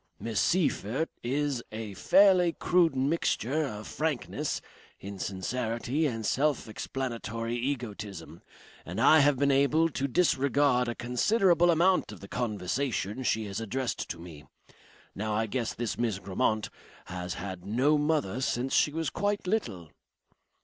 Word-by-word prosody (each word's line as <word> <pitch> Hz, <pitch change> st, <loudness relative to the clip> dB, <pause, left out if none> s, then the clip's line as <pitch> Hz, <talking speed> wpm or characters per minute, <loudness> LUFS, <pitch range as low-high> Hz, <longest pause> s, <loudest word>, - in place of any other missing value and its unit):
Miss 115 Hz, -2 st, -2 dB
Seyffert 160 Hz, -, +1 dB
is 135 Hz, 0 st, -1 dB
a 110 Hz, -2 st, -6 dB
fairly 180 Hz, -, +5 dB
crude 170 Hz, -4 st, +2 dB
mixture 145 Hz, +1 st, 0 dB
of 105 Hz, -5 st, -6 dB
frankness, 155 Hz, -3 st, -2 dB, 0.4 s
insincerity 115 Hz, -, -2 dB
and 115 Hz, -4 st, -4 dB
self 145 Hz, +1 st, +1 dB
explanatory 115 Hz, 0 st, -4 dB
egotism, 105 Hz, -, -5 dB, 0.4 s
and 90 Hz, +5 st, -6 dB
I 155 Hz, +7 st, +7 dB
have 145 Hz, -1 st, +4 dB
been 140 Hz, +1 st, +3 dB
able 145 Hz, +4 st, +3 dB
to 140 Hz, -2 st, -2 dB
disregard 140 Hz, -4 st, +2 dB
a 120 Hz, -, -2 dB
considerable 175 Hz, -, +3 dB
amount 175 Hz, -1 st, +3 dB
of 105 Hz, -, -10 dB
the 100 Hz, -, -10 dB
conversation 110 Hz, +1 st, -2 dB
she 110 Hz, -3 st, 0 dB
has 100 Hz, 0 st, -4 dB
addressed 125 Hz, +3 st, -3 dB
to 85 Hz, -, -4 dB
me. 80 Hz, -4 st, -11 dB, 0.7 s
Now 105 Hz, +1 st, -2 dB
I 110 Hz, +1 st, +1 dB
guess 115 Hz, +1 st, -2 dB
this 120 Hz, -2 st, -3 dB
Miss 115 Hz, -5 st, 0 dB
Grammont 100 Hz, +3 st, -1 dB, 0.3 s
has 90 Hz, 0 st, -5 dB
had 95 Hz, 0 st, -6 dB
no 130 Hz, +9 st, +2 dB
mother 145 Hz, -7 st, 0 dB
since 130 Hz, 0 st, -1 dB
she 150 Hz, -, +4 dB
was 160 Hz, +1 st, -2 dB
quite 205 Hz, 0 st, -1 dB
little." 100 Hz, -, -2 dB
125 Hz, 135 wpm, -29 LUFS, 105-150 Hz, 0.7 s, I